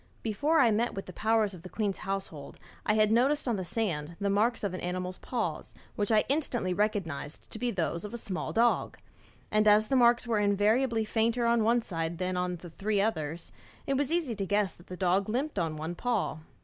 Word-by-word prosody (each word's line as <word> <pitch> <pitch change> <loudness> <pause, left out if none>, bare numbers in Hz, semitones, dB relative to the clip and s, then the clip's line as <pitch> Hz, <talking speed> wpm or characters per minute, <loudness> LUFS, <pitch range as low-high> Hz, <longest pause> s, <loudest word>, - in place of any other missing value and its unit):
Before 290 +9 +1
I 240 -6 +5
met 230 +3 0
with 195 - -5
the 185 - -10
officers 220 -1 +1
of 180 - -10
the 185 - -10
queen's 205 -2 -2
household 195 -8 -5 0.3
I 210 - +3
had 215 0 +4
noticed 270 +5 +2
on 235 - +1
the 190 - -3
sand 170 -6 -2
the 200 -1 0
marks 220 +4 +1
of 200 -3 -1
an 185 - -5
animal's 180 +1 -3
paws, 220 -11 -3 0.2
which 205 +2 -1
I 215 -1 +5
instantly 250 -10 0
recognised 180 -8 -2
to 220 - -7
be 245 - 0
those 170 -5 -2
of 210 - -6
a 235 - -4
small 190 -5 -3
dog; 235 +1 +2 0.5
and 215 0 +3
as 210 +1 +5
the 270 - +2
marks 240 -1 +5
were 230 -3 +1
invariably 215 +3 +2
fainter 230 +2 +1
on 235 -1 +3
one 235 +2 +3
side 165 -3 -3
than 185 +1 -2
on 180 0 -1
the 175 0 -11
three 205 +4 -1
others, 165 -6 -2 0.3
it 275 - 0
was 285 +2 0
easy 330 -8 0
to 195 - -1
guess 205 -2 +1
that 175 - -19
the 180 - -7
dog 190 +2 +1
limped 260 +1 -1
on 160 -2 -1
one 160 +3 -4
paw. 220 -4 -1
210 Hz, 215 wpm, -29 LUFS, 180-235 Hz, 0.5 s, I